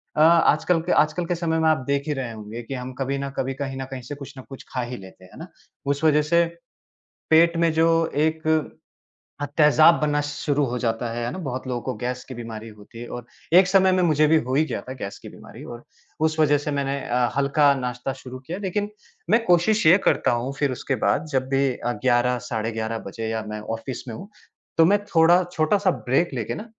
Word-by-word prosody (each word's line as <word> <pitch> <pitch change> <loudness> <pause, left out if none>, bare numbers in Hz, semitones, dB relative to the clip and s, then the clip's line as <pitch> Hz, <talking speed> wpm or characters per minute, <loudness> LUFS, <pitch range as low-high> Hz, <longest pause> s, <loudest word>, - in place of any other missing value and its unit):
अ, 155 - +2
आजकल 165 +1 +4
के 175 - -3
आजकल 155 +3 -4
के 175 0 -1
समय 160 -1 -1
में 160 0 +3
आप 155 -4 +1
देख 140 +1 -1
ही 150 - 0
रहे 130 -4 -4
होंगे 110 +2 -8
कि, 135 - -7
हम 130 0 -6
कभी 135 +1 -1
न 140 0 -4
कभी, 135 0 -1
कहीं 135 -1 -5
न - - -4
कहीं 130 -1 -6
से 125 +4 -7
कुछ 140 -1 -10
न - - -7
कुछ 135 - -10
खा 125 - -1
ही 120 +1 -5
लेते 95 -2 -14
हैं, 90 - -16
है - - -12
ना? - - -8 0.4
उस 140 +2 -1
वज़ह 150 -1 +4
से 170 0 +5 0.8
पेट 165 +1 +5
में 165 -1 +3
जो 160 +1 +3 0.3
एक 155 +1 0 0.9
अ, 145 - 0
तहजाब 155 +2 +6
बनना 145 -1 +1
शुरू 145 0 -1
हो 125 -1 -3
जाता 115 0 -1
है, 120 - -3
है 120 - -3
ना? - - -6
बहुत 130 -7 -5
लोगों 120 -2 -3
को 130 - -3
गैस 125 +2 -4
की 130 - -9
बीमारी 115 -1 -7
होती 105 +2 -14
है 120 - -7
और 120 - -9 0.3
एक 180 +1 +7
समय 190 -1 +4
में 185 0 +2
मुझे 155 -2 +3
भी 160 +1 +5
हो 130 +2 -4
ही 155 - +4
गया - - -4
था 130 - -8
गैस 100 - -5
की - - -10
बीमारी - - -13
और 120 0 -9 0.4
उस 160 0 -4
वज़ह 150 -1 +4
से 145 +1 -4
मैंने 140 -1 -1
अ, 120 0 +1
हल्का 140 +1 +3
नाश्ता 125 0 -4
शुरू 130 -1 -10
किया, 160 +8 -6
लेकिन 205 +2 -2 0.4
मैं 230 +1 +4
कोशिश 180 +4 +3
ये 175 +4 +8
करता - - +2
हूँ, 120 +3 -2
फिर 145 -2 +1
उसके 130 +1 -2
बाद 155 - +1
जब 130 -1 0
भी 135 0 +2 0.4
11 125 0 +2
साढ़े 115 -4 -2
11 110 0 -3
बजे 110 +3 -5
या 110 -1 -2
मैं 105 0 -5 0.2
ऑफ़िस 120 +3 -7
में 115 - -6
हूँ 200 +4 -10 0.5
तो 165 - +6
मैं 205 +4 +4
थोड़ा 175 -1 +4
छोटा-सा 185 +5 +2 0.2
ब्रेक 135 +6 +1
लेके 115 -4 -3
न 215 - -7
140 Hz, 235 wpm, -23 LUFS, 125-160 Hz, 0.9 s, ये